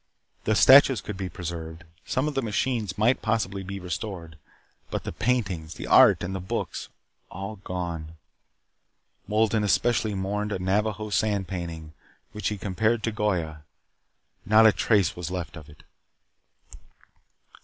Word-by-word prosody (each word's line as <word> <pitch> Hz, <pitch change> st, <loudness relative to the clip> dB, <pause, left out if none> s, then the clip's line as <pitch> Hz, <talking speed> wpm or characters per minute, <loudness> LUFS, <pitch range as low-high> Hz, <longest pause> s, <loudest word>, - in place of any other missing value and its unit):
The 110 Hz, -, +2 dB
statues 135 Hz, +1 st, +7 dB
could 105 Hz, -, -6 dB
be 95 Hz, -1 st, -4 dB
preserved. 85 Hz, -2 st, -7 dB, 0.2 s
Some 130 Hz, +4 st, 0 dB
of 150 Hz, -, -2 dB
the 135 Hz, -, 0 dB
machines 110 Hz, -3 st, -1 dB
might 115 Hz, +5 st, +2 dB
possibly 110 Hz, -3 st, -1 dB
be 100 Hz, +1 st, -6 dB
restored. 90 Hz, -1 st, -6 dB, 0.5 s
But -, -, -3 dB
the -, -, -4 dB
paintings, 95 Hz, -11 st, -1 dB
the -, -, -7 dB
art, -, -, +6 dB
and 95 Hz, -, -3 dB
the 95 Hz, -, -3 dB
books. 100 Hz, +6 st, -4 dB, 0.4 s
All 100 Hz, +3 st, -6 dB
gone. 85 Hz, -4 st, -5 dB, 1.1 s
Wolden 110 Hz, 0 st, +2 dB
especially 110 Hz, +1 st, +1 dB
mourned 105 Hz, +2 st, -2 dB
a -, -, -1 dB
Navajo 105 Hz, +3 st, -1 dB
sand 100 Hz, -1 st, 0 dB
painting, 85 Hz, -4 st, -6 dB, 0.4 s
which 105 Hz, -3 st, -3 dB
he 105 Hz, -, -2 dB
compared 110 Hz, +4 st, 0 dB
to 115 Hz, -, 0 dB
Goya. 90 Hz, -8 st, -2 dB, 0.8 s
Not 110 Hz, +3 st, +5 dB
a 110 Hz, -, +8 dB
trace 105 Hz, -3 st, +2 dB
was 90 Hz, -1 st, -5 dB
left 90 Hz, -2 st, -5 dB
of 80 Hz, -3 st, -11 dB
it. 75 Hz, -, -17 dB
100 Hz, 145 wpm, -26 LUFS, 90-110 Hz, 1.1 s, a